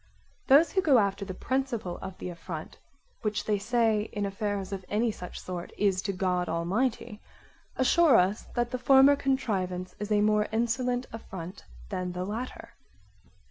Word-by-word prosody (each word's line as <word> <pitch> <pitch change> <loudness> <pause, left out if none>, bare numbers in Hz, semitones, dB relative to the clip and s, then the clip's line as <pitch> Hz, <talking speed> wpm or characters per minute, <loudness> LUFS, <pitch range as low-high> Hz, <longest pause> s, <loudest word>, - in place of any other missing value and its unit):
Those 290 +5 +6
who 380 - +2
go 285 -7 +5
after 200 -2 +1
the 185 -1 -6
principle 250 -7 -2
of 190 -1 -7
the - - -5
affront, 170 -2 -7 0.4
which 210 -1 -2
they 210 -2 +1
say 220 -1 +1
in 205 -1 -1
affairs 200 -1 -3
of 195 -1 -4
any 220 +3 +1
such 180 -4 -8
sort 180 -1 -6
is 195 -2 +2
to 200 - -2
God 180 -2 -1
Almighty, 210 +6 -1 0.5
assure 310 +3 +5
us 190 +4 +2
that 240 0 0
the 255 - -2
former 270 +2 +6
contrivance 190 -10 -1
is 210 +1 -5
a 210 -1 +4
more 210 0 +3
insolent 245 +2 0
affront 185 -5 -8 0.2
than 180 -1 -3
the 180 +1 -3
latter. 225 +6 -6
210 Hz, 160 wpm, -28 LUFS, 185-245 Hz, 0.5 s, Those